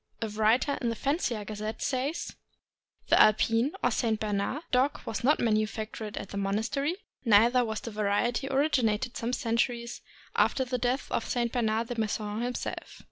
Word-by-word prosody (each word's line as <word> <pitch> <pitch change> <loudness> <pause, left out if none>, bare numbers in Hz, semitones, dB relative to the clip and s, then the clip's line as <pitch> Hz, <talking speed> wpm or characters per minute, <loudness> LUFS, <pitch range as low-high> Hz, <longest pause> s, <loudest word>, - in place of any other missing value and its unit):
A 225 - -2
writer 220 +6 +2
in 240 - 0
the 230 - -2
Fancier' 275 - -1
s - - -8
Gazette 215 +1 -5
says: 275 +5 -2 0.7
The - - +6
Alpine 225 +5 +4
(or - - +3
St. 220 -3 0
Bernard) 210 +8 -2
dog 260 +3 +2
was 220 - -4
not 295 +5 +4
manufactured 215 -1 -1
at 195 - -5
the 200 - -6
monastery, 220 - -1 0.3
neither 235 +2 +5
was 220 -2 -3
the 230 - -6
variety 215 +5 0
originated 250 -5 +1
some 235 +1 -2
centuries 235 0 -1 0.3
after 260 - +2
the 250 0 -2
death 250 +3 0
of - - -1
St. 235 -1 0
Bernard 225 -2 0
de 240 -2 -3
Menthon 215 0 -2
himself. 245 +1 -4
230 Hz, 165 wpm, -29 LUFS, 215-250 Hz, 0.7 s, The